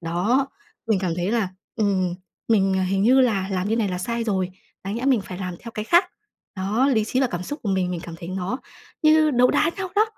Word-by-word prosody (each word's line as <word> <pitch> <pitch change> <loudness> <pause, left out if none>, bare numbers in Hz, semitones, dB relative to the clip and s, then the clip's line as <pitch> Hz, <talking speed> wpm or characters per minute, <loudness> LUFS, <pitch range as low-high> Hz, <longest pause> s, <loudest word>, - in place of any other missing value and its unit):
Đó, 185 +11 +1 0.4
mình 220 -3 +2
cảm 180 -3 -1
thấy 180 +3 -1
là, 225 -4 +1 0.3
ừm, 190 -5 +1 0.3
mình 195 -4 +3
hình 190 +1 +1
như 255 +5 +5
là 205 -7 +2
làm 185 0 -1
như 225 - +1
này 220 -3 +1
là 180 -1 -3
sai 235 +4 -2
rồi, 190 -4 0 0.3
đáng 195 +2 -3
nhẽ 235 +3 -3
mình 265 -5 +3
phải 185 -2 -8
làm 180 -2 -4
theo 230 - -8
cái 215 - -4
khác. 345 - +5 0.5
Đó, 210 +8 +1
lý 225 -6 +2
trí 255 +4 0
và 265 - +3
cảm 175 -7 -4
xúc 290 - -5
của 215 - -3
mình, 185 -2 0
mình 175 -2 -3
cảm 170 -2 -8
thấy 170 - -8
nó 190 +6 -3 0.4
như 310 0 +5
đấu 250 -2 +4
đá 325 - +2
nhau 385 -1 -3
đó. 425 - +6
205 Hz, 240 wpm, -23 LUFS, 185-245 Hz, 0.5 s, đó